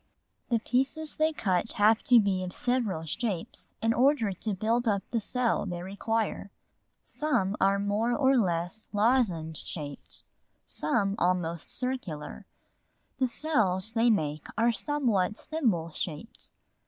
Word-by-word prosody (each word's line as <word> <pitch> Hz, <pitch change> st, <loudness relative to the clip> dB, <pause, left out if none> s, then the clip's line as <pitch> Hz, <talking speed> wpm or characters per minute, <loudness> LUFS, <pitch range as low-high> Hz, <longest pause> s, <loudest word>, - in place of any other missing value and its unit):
The 235 Hz, -, +3 dB
pieces 270 Hz, +7 st, -1 dB
they 315 Hz, +1 st, +3 dB
cut 195 Hz, -, -1 dB
have 215 Hz, +1 st, +4 dB
to 245 Hz, -2 st, +7 dB
be 195 Hz, -3 st, +1 dB
of 180 Hz, 0 st, -5 dB
several 240 Hz, -10 st, -1 dB
shapes 190 Hz, +1 st, -4 dB
in 225 Hz, 0 st, +3 dB
order 250 Hz, -4 st, +3 dB
to 200 Hz, +3 st, -3 dB
build 230 Hz, +4 st, 0 dB
up 200 Hz, -2 st, +1 dB
the 230 Hz, -, +1 dB
cell 245 Hz, +2 st, 0 dB
they 175 Hz, 0 st, -4 dB
require; 200 Hz, +2 st, -2 dB, 0.5 s
some 210 Hz, -11 st, 0 dB
are 195 Hz, +1 st, +4 dB
more 205 Hz, +4 st, 0 dB
or 270 Hz, +1 st, +3 dB
less 175 Hz, -2 st, 0 dB
lozenge 205 Hz, -, +1 dB
shaped, 145 Hz, -4 st, -4 dB, 0.4 s
some 195 Hz, +6 st, 0 dB
almost 175 Hz, -2 st, 0 dB
circular; 245 Hz, -, -4 dB, 0.7 s
the 260 Hz, -, +3 dB
cells 220 Hz, -8 st, 0 dB
they 230 Hz, +1 st, +3 dB
make 155 Hz, -8 st, 0 dB
are 230 Hz, +1 st, +4 dB
somewhat 230 Hz, -6 st, 0 dB
thimble 220 Hz, -, -1 dB
shaped. 160 Hz, +7 st, -6 dB
215 Hz, 130 wpm, -29 LUFS, 180-245 Hz, 0.7 s, to